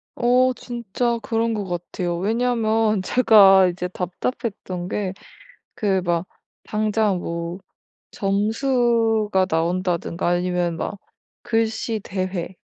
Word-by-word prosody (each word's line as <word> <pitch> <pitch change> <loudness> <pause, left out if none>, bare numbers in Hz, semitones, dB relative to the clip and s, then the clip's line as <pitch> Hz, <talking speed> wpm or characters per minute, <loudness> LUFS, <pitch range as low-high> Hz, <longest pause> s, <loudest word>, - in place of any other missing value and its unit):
어. 250 +1 +3
진짜 235 0 -2
그런 230 0 0
것 205 -2 -3
같아요. 175 0 -3
왜냐하면 220 0 +1
제가 195 -4 +6
이제 180 0 -3
답답했던 185 0 -4
게 195 -3 -2 0.6
그 195 -4 +1
막 170 0 0 0.4
당장 215 -2 0
뭐 170 +1 -4 0.5
점수가 220 -1 +1
나온다든가 170 +1 -1
아니면 175 -1 0
막 205 - -4 0.5
글씨 225 -1 -1
대회, 185 -2 -4
200 Hz, 205 characters per minute, -22 LUFS, 180-225 Hz, 0.6 s, 제가